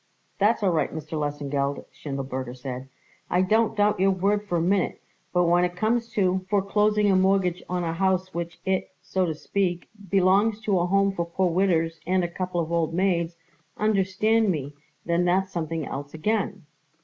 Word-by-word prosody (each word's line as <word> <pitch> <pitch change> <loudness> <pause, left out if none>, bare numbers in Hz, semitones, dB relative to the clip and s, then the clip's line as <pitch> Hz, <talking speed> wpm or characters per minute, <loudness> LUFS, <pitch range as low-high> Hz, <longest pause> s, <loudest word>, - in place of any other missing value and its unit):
"That's 210 +2 +3
all 190 - +3
right, 165 - 0
Mr. 155 0 -7
Lesengeld," 145 -2 -2
Schindelberger 130 -3 -5
said. 130 0 -6 0.4
"I 180 +1 +3
don't 220 +3 +2
doubt 205 -1 +3
your 195 +1 +4
word 200 +2 +1
for 175 - 0
a - - +1
minute, 185 +2 +1 0.3
but 180 0 +3
when 175 +1 +4
it 180 0 -1
comes 230 +5 0
to 185 -2 +1
foreclosing 210 +1 +2
a - - +4
mortgage 185 -1 +2
on 180 0 -1
a 165 -1 -1
house 185 +1 0
which 170 0 -5
it, 190 -1 0
so 185 -1 0
to 160 - -2
speak, 175 +1 -2 0.2
belongs 200 +3 +3
to 205 -4 +1
a 175 - +1
home 195 +1 +3
for 175 -3 -2
poor 180 +1 0
widders 165 -3 +1
and 185 0 +2
a - - 0
couple 180 0 -3
of 165 0 -2
old 165 -1 0
maids, 175 -2 +1 0.4
understand 215 +1 +2
me, 145 -5 -2 0.3
then 170 +1 +1
that's 185 +2 +1
something 165 -3 -3
else 140 +3 -6
again." 200 +1 -1
180 Hz, 180 wpm, -25 LUFS, 165-195 Hz, 0.4 s, your